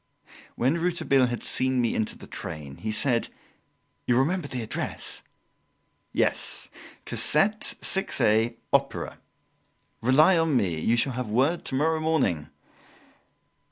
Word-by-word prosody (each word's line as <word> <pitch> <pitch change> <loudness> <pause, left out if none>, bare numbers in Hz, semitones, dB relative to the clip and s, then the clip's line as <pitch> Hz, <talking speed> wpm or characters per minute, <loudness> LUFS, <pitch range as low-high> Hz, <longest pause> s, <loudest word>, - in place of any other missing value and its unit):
When 135 +8 +1
Rouletabille 165 -7 +2
had 120 -1 -4
seen 130 0 +2
me 120 -2 +1
into 110 - -2
the - - -12
train, 75 -4 -8
he 110 - -4
said: 120 +1 +1 0.8
"You'll 120 - +3
remember 155 +4 +1
the 125 -4 -4
address?" 110 - -3 0.9
"Yes, - - 0 0.4
Cassette, 205 +8 +2
6a, 115 - +1 0.2
Opera. - - 0 0.8
Rely 155 +9 +5
on 160 -4 +2
me; 90 -8 0
you 115 +8 +1
shall 130 +3 +1
have 125 -1 -4
word 135 +10 +1
tomorrow 155 +4 0
morning." 125 - 0
130 Hz, 120 wpm, -26 LUFS, 115-155 Hz, 0.9 s, Rely